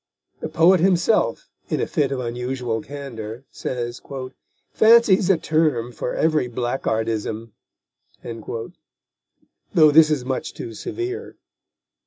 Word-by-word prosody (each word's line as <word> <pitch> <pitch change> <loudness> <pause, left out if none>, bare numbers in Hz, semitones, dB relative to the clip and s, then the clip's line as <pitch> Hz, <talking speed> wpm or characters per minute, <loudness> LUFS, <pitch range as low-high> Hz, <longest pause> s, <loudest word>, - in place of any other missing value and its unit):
The 155 - -5
poet 165 +4 +5
himself, 180 - +2 0.2
in - - 0
a - - +1
fit 140 -3 0
of 135 - -2
unusual 125 -1 -3
candour, 120 -4 -7
says: 120 -1 -4 0.7
Fancy's 220 -4 +5
a 190 - +5
term 155 -8 +1
for 120 +1 -4
every 155 -6 +1
blackguardism, 115 -2 -2 2.2
though 155 -3 +7
this 155 +1 +7
is 145 -5 -1
much 130 0 -3
too 115 - -7
severe. 375 - -5
135 Hz, 110 wpm, -22 LUFS, 120-160 Hz, 2.2 s, though